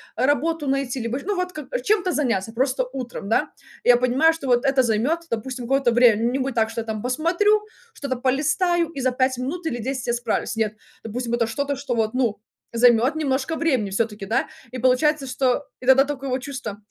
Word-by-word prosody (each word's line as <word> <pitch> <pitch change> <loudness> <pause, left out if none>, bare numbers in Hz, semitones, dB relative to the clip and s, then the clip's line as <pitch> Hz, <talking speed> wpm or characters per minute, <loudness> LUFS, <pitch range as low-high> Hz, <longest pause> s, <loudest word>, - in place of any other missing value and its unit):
работу 290 +4 +1
найти, 270 -1 -1
либо 230 +3 -2
ещ - - -8
ну, 410 +1 -1
вот 360 0 -2
к 295 -5 -4
чем-то 380 +4 +1
заняться, 230 - -1
просто 260 +1 +1
утром, 245 -6 -6
да. 225 - +2 0.3
Я 245 -1 +6
понимаю, 255 +6 +3
что 325 -3 -8
вот 245 0 +3
это 270 -1 +3
займет, 245 +9 +1
допустим, 245 +2 -4
какое-то 270 0 +2
время. 230 -2 +5
Не 260 - -1
будет 270 -1 -2
так, 220 -1 +2
что 230 - -4
я 225 - -8
там 215 -1 -4
посмотрю, 345 - +2 0.3
что-то 275 -2 -3
полистаю 310 +6 +1
и 280 -5 -6
за 255 0 +2
5 260 0 +1
минут 315 +8 -4
или 240 -7 -2
10 260 +2 -3
я 240 - +1
справлюсь. 240 -1 -2
Нет, 220 -1 -1 0.3
допустим, 235 +2 -4
это 235 -1 +1
что-то, 280 +5 -2
что 265 -2 -3
вот, 220 -1 0
ну, 235 -5 0 0.3
займет 240 +4 +4
немножко 285 0 -1
времени 260 -12 0
всё-таки, 210 0 -2
да. 225 - 0 0.2
И 255 - -5
получается, 270 +4 +2
что, 260 +1 0 0.2
и 250 - -8
тогда 265 +1 +6
такое 275 -1 -4
вот 255 0 -2
чувство: 255 -7 -6
260 Hz, 205 wpm, -23 LUFS, 235-285 Hz, 0.3 s, Я